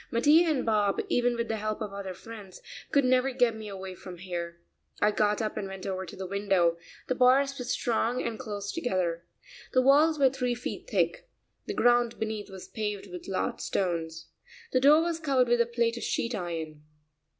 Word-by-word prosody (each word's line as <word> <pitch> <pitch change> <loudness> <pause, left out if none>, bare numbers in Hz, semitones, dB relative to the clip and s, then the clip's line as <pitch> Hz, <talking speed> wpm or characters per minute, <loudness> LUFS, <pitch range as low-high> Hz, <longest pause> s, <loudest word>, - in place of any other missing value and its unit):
Mattia 300 +8 +5
and 295 -4 0
Bob, 210 -3 +2
even 245 0 +2
with 235 0 -2
the 220 - -2
help 215 0 -3
of 210 -3 -5
other 195 -2 -6
friends, 205 -2 -11 0.3
could 280 -2 +4
never 255 +1 +3
get 245 -3 +2
me 220 -1 -8
away 190 -2 -7
from 180 0 -10
here. 170 -1 -5 0.4
I 210 - +4
got 210 +1 +1
up 215 - -3
and 205 -2 -3
went 195 -1 -8
over 190 -1 -3
to - - -9
the 190 - -6
window; 185 -3 +1 0.3
the - - +1
bars 265 +2 +3
were 250 - -4
strong 240 0 0
and 225 -2 -4
close 205 -5 -5
together. 180 - -2 0.5
The 255 - +4
walls 300 +4 +5
were 270 -2 +4
three 250 -2 -1
feet 245 - -6
thick. - - 0 0.4
The 410 - -3
ground 240 -1 +3
beneath 220 -2 -4
was 190 -1 -10
paved 210 -3 -4
with 180 -1 -8
large 190 - -2
stones. 165 -3 -2 0.5
The 255 - +4
door 295 +4 +7
was 335 -1 -2
covered 270 -5 +2
with 240 0 +3
a 235 - +2
plate 235 0 0
of - - -5
sheet 235 +1 -1
iron.... 165 -6 -4
220 Hz, 195 wpm, -28 LUFS, 190-250 Hz, 0.5 s, door